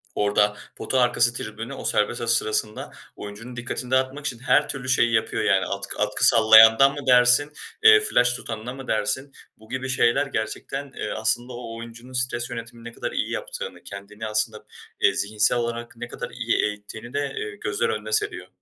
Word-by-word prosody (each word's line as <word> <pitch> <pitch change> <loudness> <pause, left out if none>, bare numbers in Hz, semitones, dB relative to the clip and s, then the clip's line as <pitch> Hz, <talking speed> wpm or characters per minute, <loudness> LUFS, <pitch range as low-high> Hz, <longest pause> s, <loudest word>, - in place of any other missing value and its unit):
Orada 105 0 +2 0.2
pota 130 - -1
arkası 120 -1 +3
tribünü, 115 +3 -6
o - - -8
serbest 105 +3 0
atış 115 0 +2
sırasında 110 -1 -2 0.2
oyuncunun 115 +5 -9
dikkatini 125 +1 -5
dağıtmak 130 +2 0
için 125 -6 -3
her 145 +3 +2
türlü 130 -2 -5
şeyi 120 -2 +3
yapıyor 110 - 0
yani. 95 -2 +2
Atkı 100 0 -5
atkı 105 +4 +2
sallayandan 110 +3 +7
mı 145 - -6
dersin, 125 +3 +5 0.3
eee, 435 -1 +9
flaş 125 - +2
tutanına 115 0 -6
mı 135 -1 -10
dersin, 130 +6 -1 0.3
bu 110 0 -19
gibi 130 0 -4
şeyler 130 +1 +2
gerçekten, 135 +3 -4
eee, - - -4
aslında 120 +3 -1
o 115 -1 -7
oyuncunun 115 +2 -11
stres 125 -1 -1
yönetimini 115 0 -8
ne - - -14
kadar - - -5
iyi - - -2
yaptığını, - - -6
kendini 105 +2 -8
aslında, 110 0 -2 0.4
eee, - - +4
zihinsel 105 +3 +1
olarak 120 0 -4
ne 120 +1 -6
kadar - - -7
iyi - - -1
eğittiğini 105 +3 -5
de, 145 0 -2
eee, 430 -1 -4
gözler 445 +1 -2
önüne 460 - -4
seriyor. 420 -1 -1
120 Hz, 175 wpm, -24 LUFS, 110-130 Hz, 0.4 s, eee